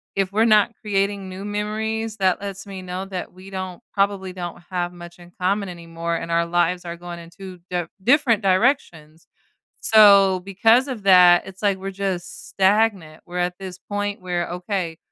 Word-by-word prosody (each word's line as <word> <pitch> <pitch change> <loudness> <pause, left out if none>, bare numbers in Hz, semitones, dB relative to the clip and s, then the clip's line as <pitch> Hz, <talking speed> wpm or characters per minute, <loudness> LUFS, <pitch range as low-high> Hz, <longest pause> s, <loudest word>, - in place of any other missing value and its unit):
if 195 -1 0
we're 220 +3 +3
not 215 0 +4
creating 200 -1 -1
new 190 +1 -8
memories 215 +2 -3
that 190 -2 +2
lets 195 -1 -6
me 190 -1 -7
know 185 +1 -5
that 185 -2 -6
we 185 +2 -13
don't 185 +1 -6
probably 195 -2 0
don't 175 -1 -7
have 175 -1 -2
much 175 0 -12
in 175 0 -14
common 200 +2 0
anymore, 170 -1 -5
and 165 0 -5
our 170 0 +2
lives 175 +1 0
are 170 0 -5
going 175 0 -8
in 165 0 -12
2 185 0 -11
diff 175 -2 -2 0.2
different 245 -3 +3
directions. 185 - 0 0.5
So, 200 -4 +6
because 225 +7 +3
of 230 -6 -6
that, 180 -2 +6
it's 190 0 -11
like 200 -2 +2
we're 195 +1 -6
just 185 -2 -4
stagnant, 195 -5 +1
we're 180 0 -7
at 180 0 -1
this 185 -2 -8
point 205 0 -4
where, 175 -2 -2
okay, 180 -2 -3
190 Hz, 180 wpm, -22 LUFS, 175-200 Hz, 0.5 s, So